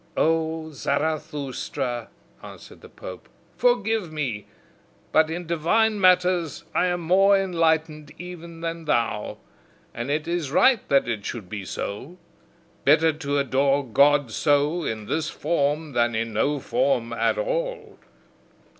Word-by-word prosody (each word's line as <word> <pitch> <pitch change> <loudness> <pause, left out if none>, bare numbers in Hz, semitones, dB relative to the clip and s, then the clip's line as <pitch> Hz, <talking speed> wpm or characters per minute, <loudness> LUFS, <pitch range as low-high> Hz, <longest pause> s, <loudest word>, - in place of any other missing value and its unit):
"O 160 0 0
Zarathustra," 140 -4 -3 0.3
answered - - -12
the - - -13
pope, 90 -8 -10 0.3
"forgive 225 -6 +1
me, 130 -9 -3 0.6
but 155 0 +4
in 175 +2 -4
divine 205 +7 +1
matters 180 -3 +3
I 180 - +2
am 175 -1 -1
more 195 +4 +4
enlightened 160 -5 0
even 170 -1 -9
than 165 0 -4
thou. 115 -7 -1 0.6
And 120 +3 -5
it 150 +2 -1
is 170 -4 -2
right 245 - +4
that 140 -2 +3
it 110 -4 -3
should 105 -5 -6
be 100 -2 -6
so. 130 - -6 0.7
Better 160 +3 +4
to 145 -2 -2
adore 140 +1 +1
God 140 +1 +3
so, 145 +6 +1
in 110 -6 -4
this 155 +6 -1
form, 150 -1 -1
than 120 -2 +1
in 115 0 -2
no 145 +7 +1
form 120 -3 0
at 115 - +1
all! - - -3
155 Hz, 130 wpm, -24 LUFS, 135-170 Hz, 0.7 s, but